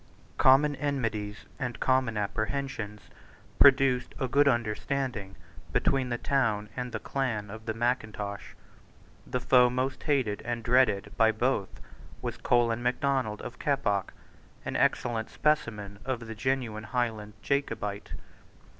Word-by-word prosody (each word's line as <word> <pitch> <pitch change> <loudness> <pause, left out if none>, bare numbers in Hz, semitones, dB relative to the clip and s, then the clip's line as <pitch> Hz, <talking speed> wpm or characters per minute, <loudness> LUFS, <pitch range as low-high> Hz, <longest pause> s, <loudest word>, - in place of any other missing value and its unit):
Common 145 +3 +6
enmities 115 -8 -2
and 125 -3 -3
common 130 -4 +2
apprehensions 110 +1 -3 0.6
produced 135 -2 +5
a 130 - 0
good 140 +3 +4
understanding 120 -3 -1 0.4
between 135 -2 +1
the 120 - -1
town 115 -7 0
and 125 -1 -4
the - - -2
clan 110 -7 -2
of 110 +1 -10
Mackintosh. 110 -3 -2 0.7
The 125 - -1
foe 125 0 +5
most 130 +2 -2
hated 130 -9 0
and 120 0 -3
dreaded 115 -4 +2
by 110 0 +5
both 110 -3 -1 0.4
was - - -4
Colin 120 -1 +2
Macdonald 125 -3 0
of 125 - -8
Keppoch, 105 -9 0 0.5
an - - -3
excellent 115 -2 +1
specimen 105 -9 -1
of 130 -2 -2
the 115 -1 -6
genuine 115 -2 -2
Highland 110 -2 -2
Jacobite. 105 -7 -2
120 Hz, 120 wpm, -29 LUFS, 105-130 Hz, 0.7 s, Common